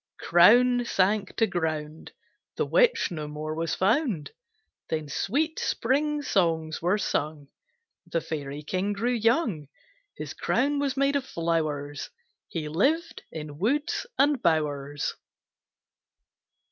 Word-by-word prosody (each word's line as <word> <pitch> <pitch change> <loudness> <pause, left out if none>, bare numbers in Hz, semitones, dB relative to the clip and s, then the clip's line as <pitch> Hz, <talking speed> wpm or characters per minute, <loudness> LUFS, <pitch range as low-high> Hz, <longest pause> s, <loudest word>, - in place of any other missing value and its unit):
Crown 245 +8 +5
sank 200 -2 +1
to 225 - +3
ground; 160 -5 -3 0.4
The - - 0
Witch - - +3
no 155 -3 -4
more 155 +1 -5
was 165 +1 -2
found. 210 - +1 0.6
Then 155 -2 -2
sweet 295 - -1
spring 295 +4 0
songs 165 - 0
were 180 +5 +2
sung, 150 -7 -2 0.6
The 170 -1 0
Fairy 145 -2 -5
King 185 +6 -1
grew 235 +5 0
young, 225 - +1 0.5
His - - -6
crown 285 +3 +1
was 280 -2 -1
made 275 +1 +2
of 280 - +1
flowers, 155 - -2 0.4
He 160 -3 -4
lived 280 - 0
in 150 -2 -7
woods 290 - 0
and 280 -2 +3
bowers. 145 -3 0
185 Hz, 120 wpm, -27 LUFS, 155-255 Hz, 0.6 s, Crown